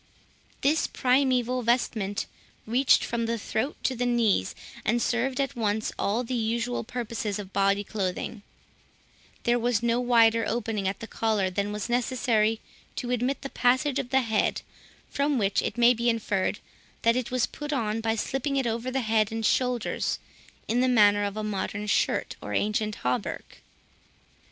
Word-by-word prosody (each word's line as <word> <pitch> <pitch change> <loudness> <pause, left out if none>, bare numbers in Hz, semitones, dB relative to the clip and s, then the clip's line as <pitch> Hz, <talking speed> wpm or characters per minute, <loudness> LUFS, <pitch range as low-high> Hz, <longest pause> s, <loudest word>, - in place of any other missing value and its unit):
This 305 +3 +2
primeval 255 -1 +2
vestment 220 -4 0 0.4
reached 250 +5 +4
from 230 -1 -2
the 230 0 -1
throat 225 +6 -2
to 260 - +1
the 245 +1 -1
knees, 220 - +1 0.3
and 235 +3 +1
served 250 +2 0
at 275 0 -1
once 220 -2 -1
all 220 +5 0
the 250 - -5
usual 235 +1 -1
purposes 225 -3 -3
of 200 -2 -8
body 200 +1 +2
clothing; 200 +1 -3 1.0
there 240 0 +2
was 235 -2 +1
no 235 0 +2
wider 230 -2 +4
opening 220 -3 -1
at 195 +1 -3
the 225 - -6
collar, 215 -5 0
than 200 +2 -1
was 210 0 -4
necessary 240 -3 +1 0.4
to 245 - -3
admit 250 +4 -1
the 275 - -4
passage 260 +3 +2
of 265 -3 -4
the 265 +1 +3
head, 220 -3 0 0.5
from 285 0 +1
which 200 -3 +1
it 220 - -3
may 240 +1 +6
be 235 0 0
inferred, 205 -4 -1 0.4
that 230 0 +4
it 255 0 -1
was 255 -2 +1
put 295 0 -7
on 225 -5 -1
by 225 0 0
slipping 270 +5 -2
it 265 - +1
over 235 +2 -2
the 265 +1 -1
head 220 -2 +1
and 225 0 -2
shoulders, 250 -2 0 0.5
in 235 - +1
the 255 - +3
manner 205 -4 +5
of 200 +1 -3
a 215 - -2
modern 210 0 -3
shirt, 210 - 0
or - - -4
ancient 215 0 0
hauberk. 125 0 -3
230 Hz, 165 wpm, -27 LUFS, 210-250 Hz, 1.0 s, may